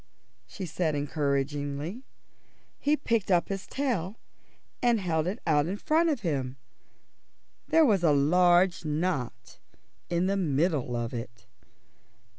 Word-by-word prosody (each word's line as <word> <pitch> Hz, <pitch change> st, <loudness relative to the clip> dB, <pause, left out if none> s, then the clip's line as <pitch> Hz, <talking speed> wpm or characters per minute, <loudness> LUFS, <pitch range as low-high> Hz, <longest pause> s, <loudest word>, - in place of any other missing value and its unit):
she 195 Hz, -, -6 dB
said 160 Hz, -2 st, -1 dB
encouragingly. 145 Hz, -, -2 dB, 0.8 s
He 295 Hz, +1 st, +2 dB
picked 230 Hz, -8 st, -1 dB
up 175 Hz, -2 st, +2 dB
his 195 Hz, 0 st, -4 dB
tail 225 Hz, -9 st, -2 dB, 0.7 s
and 240 Hz, -2 st, +3 dB
held 165 Hz, -4 st, 0 dB
it 195 Hz, +5 st, -2 dB
out 150 Hz, -2 st, +2 dB
in 195 Hz, +3 st, -3 dB
front 320 Hz, +8 st, +2 dB
of 285 Hz, -6 st, -1 dB
him. 135 Hz, -7 st, -2 dB, 1.1 s
There 325 Hz, -1 st, +5 dB
was 205 Hz, -8 st, +3 dB
a 160 Hz, -, +5 dB
large 175 Hz, +5 st, +4 dB
knot 150 Hz, -7 st, -3 dB, 0.5 s
in 175 Hz, +1 st, +1 dB
the 195 Hz, +1 st, +1 dB
middle 150 Hz, -6 st, 0 dB
of 120 Hz, 0 st, -3 dB
it. 115 Hz, -2 st, -7 dB
170 Hz, 125 wpm, -28 LUFS, 145-195 Hz, 1.1 s, There